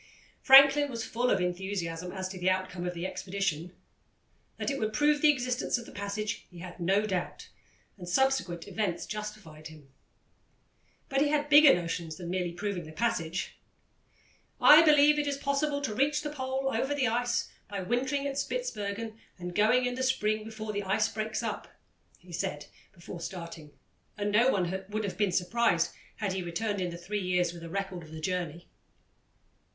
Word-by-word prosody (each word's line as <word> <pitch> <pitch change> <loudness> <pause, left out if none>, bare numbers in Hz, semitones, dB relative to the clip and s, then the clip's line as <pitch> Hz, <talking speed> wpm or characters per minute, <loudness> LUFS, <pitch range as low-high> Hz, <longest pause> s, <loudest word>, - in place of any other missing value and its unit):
Franklin 275 +1 +8
was 230 -3 -4
full 245 +2 -1
of - - +3
enthusiasm 180 -1 -3
as 190 -1 -4
to 185 0 -8
the 180 +1 +2
outcome 185 -1 -2
of 180 - -4
the 170 +1 -4
expedition. 185 -3 -3 0.9
That - - -2
it 275 - -3
would 215 -1 -1
prove 295 0 +3
the 305 - +6
existence 250 -3 0
of 235 - -8
the - - -12
passage 210 +2 -4
he 180 - -14
had 175 +1 -9
no 195 +5 +2
doubt, 185 -4 -4 0.5
and 175 -1 -7
subsequent 185 -7 +1
events 200 -6 -2
justified 210 -8 -7
him. 150 -4 -15 1.1
But 270 -1 0
he 295 - +4
had 295 0 0
bigger 295 -1 +9
notions 170 -2 -4
than 175 0 -6
merely 180 -2 -1
proving 180 -1 -4
the - - -9
passage. 180 -4 -2 1.0
"I 300 +1 +9
believe 300 -1 +6
it 295 - -1
is 280 -1 -1
possible 285 +1 0
to 265 -7 -2
reach 290 +6 +1
the 295 - -3
Pole 265 -1 -2
over 265 +5 0
the 270 -3 +1
ice 240 +1 0 0.2
by 200 -2 -4
wintering 265 +7 -1
at 280 0 -2
Spitzbergen 225 - -4 0.2
and 175 0 -6
going 220 +6 +3
in 250 - -1
the 260 - -4
spring 215 -4 +1
before 220 -1 -6
the 205 - -1
ice 200 +2 +1
breaks 215 +1 -3
up," - - -4 0.5
he 175 -1 -15
said 150 -2 -3 0.3
before 175 0 -10
starting, 170 -4 -7 0.5
and 205 0 -1
no 230 +5 +5
one 190 -3 -1
would 215 +1 -2
have 200 - -4
been 205 -3 +2
surprised 180 -2 +1 0.2
had 200 -4 -2
he 190 - -2
returned 200 +4 -2
in 180 - -1
the 170 - -7
three 200 +4 -4
years 180 -2 +1
with 170 - -10
a 165 - -7
record 195 -1 -4
of 160 - -13
the 160 - -7
journey. 175 -1 -3
205 Hz, 180 wpm, -29 LUFS, 180-255 Hz, 1.1 s, bigger